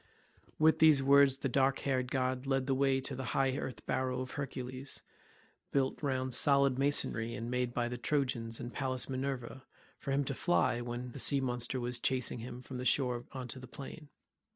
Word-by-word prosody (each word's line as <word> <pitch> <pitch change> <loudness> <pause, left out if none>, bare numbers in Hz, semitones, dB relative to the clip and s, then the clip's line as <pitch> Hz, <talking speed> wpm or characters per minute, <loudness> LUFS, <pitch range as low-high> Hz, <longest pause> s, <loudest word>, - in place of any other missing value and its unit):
With 160 +1 +4
these 155 -4 +6
words 140 0 +6
the 135 - -2
dark 135 +1 +2
haired 130 -2 0
god 130 0 -1
led 135 -1 +1
the 135 - +1
way 135 0 +2
to 135 - -4
the 130 - -4
high 135 -1 +2
earth 130 -2 -5
barrow 130 -1 -1
of 130 - -6
Hercules, 130 -1 -5 0.7
built 135 -1 0
round 130 -3 -1
solid 140 0 +4
masonry, 120 -5 0
and 120 -1 -5
made 125 -1 0
by 120 0 -1
the 120 0 -5
Trojans 125 -5 0
and 120 - -6
Pallas 130 -2 0
Minerva 130 -1 -4 0.4
for - - -7
him 140 +1 +2
to 135 - -3
fly 130 -5 +2
to 120 - -5
when 120 +1 -5
the - - -8
sea 140 - +3
monster 125 0 -2
was 120 0 -2
chasing 125 -1 0
him 125 +2 -8
from 130 -1 -7
the - - -3
shore 125 -3 +1
on 130 -2 -6
to 130 - -7
the 130 - -10
plain. 140 +3 -9
130 Hz, 200 wpm, -33 LUFS, 125-135 Hz, 0.7 s, these